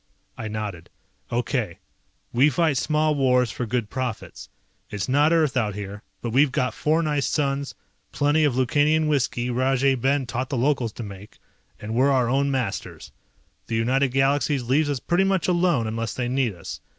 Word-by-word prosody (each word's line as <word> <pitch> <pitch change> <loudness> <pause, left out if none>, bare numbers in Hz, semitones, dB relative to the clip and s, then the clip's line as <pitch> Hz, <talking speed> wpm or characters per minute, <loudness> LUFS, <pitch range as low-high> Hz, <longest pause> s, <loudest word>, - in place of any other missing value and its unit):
I 110 - -5
nodded. 105 -5 -5 0.4
"Okay. 120 - -1 0.6
We 135 +5 +5
fight 150 0 +1
small 155 +3 +1
wars 125 -4 +2
for 125 - -4
good 115 -2 -2
profits. 130 -4 -5 0.4
It's 100 -2 -4
not 145 +4 +3
Earth 160 -5 +2
out 105 -5 0
here, 100 0 -7 0.2
but 120 - -2
we've 135 +3 +4
got 130 -2 0
four 160 +2 +1
nice 150 -2 0
suns, 140 -1 -1 0.4
plenty 145 +2 +2
of 145 -5 +2
Lukanian 150 +5 +2
whisky 125 -4 0
Rajay 135 +2 +2
Ben 135 +2 0
taught 130 +2 -3
the 135 - -2
locals 125 -3 0
to 120 - -7
make, 100 0 -10 0.4
and 105 +1 -6
we're 130 +4 +3
our 130 -4 +2
own 140 +2 +1
masters. 130 -3 -4 0.6
The 115 - -2
United 130 +5 +2
Galaxies 135 +1 +1
leaves 145 +5 +1
us 140 -3 -1
pretty 175 +8 +1
much 195 -2 +1
alone 175 -8 +2
unless 115 0 -3
they 125 -1 -2
need 125 -5 0
us. 85 - -8
130 Hz, 175 wpm, -24 LUFS, 120-145 Hz, 0.6 s, We